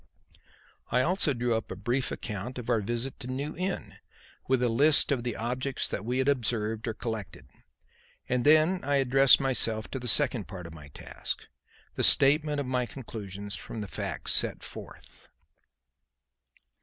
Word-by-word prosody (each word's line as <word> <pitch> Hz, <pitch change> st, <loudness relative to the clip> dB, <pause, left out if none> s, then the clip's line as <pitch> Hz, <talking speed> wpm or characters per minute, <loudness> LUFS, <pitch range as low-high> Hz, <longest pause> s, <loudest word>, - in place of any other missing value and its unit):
I 125 Hz, -, +2 dB
also 180 Hz, -1 st, +3 dB
drew 120 Hz, -2 st, 0 dB
up 110 Hz, -1 st, -3 dB
a -, -, -5 dB
brief 120 Hz, +6 st, -1 dB
account 110 Hz, +4 st, -5 dB
of 125 Hz, 0 st, -3 dB
our 115 Hz, -2 st, +2 dB
visit 120 Hz, +5 st, -3 dB
to 125 Hz, -, -7 dB
New 140 Hz, +4 st, -4 dB
Inn, 185 Hz, +2 st, -4 dB, 0.5 s
with 130 Hz, -1 st, +2 dB
a -, -, +3 dB
list 145 Hz, +7 st, +3 dB
of 135 Hz, -4 st, +1 dB
the 120 Hz, 0 st, -3 dB
objects 125 Hz, +4 st, -2 dB
that 100 Hz, -, -4 dB
we 125 Hz, +3 st, -2 dB
had 130 Hz, +1 st, +1 dB
observed 115 Hz, -5 st, 0 dB
or 110 Hz, -, -2 dB
collected. 110 Hz, -4 st, -6 dB, 0.8 s
And 125 Hz, -1 st, 0 dB
then 155 Hz, +5 st, +4 dB
I 145 Hz, +1 st, +1 dB
addressed 135 Hz, 0 st, +5 dB
myself 115 Hz, -5 st, +1 dB
to 135 Hz, -, -3 dB
the 125 Hz, -, -5 dB
second 120 Hz, -, +4 dB
part 90 Hz, -2 st, -8 dB
of 85 Hz, -, -9 dB
my 75 Hz, -3 st, -12 dB
task, 70 Hz, -, -6 dB, 0.5 s
the -, -, -2 dB
statement 150 Hz, +1 st, +4 dB
of 140 Hz, -, -2 dB
my 125 Hz, -1 st, -1 dB
conclusions 100 Hz, -6 st, -7 dB
from 115 Hz, -, -7 dB
the 105 Hz, -, -5 dB
facts -, -, -2 dB
set -, -, +1 dB
forth. -, -, -11 dB
125 Hz, 170 wpm, -28 LUFS, 110-135 Hz, 0.8 s, addressed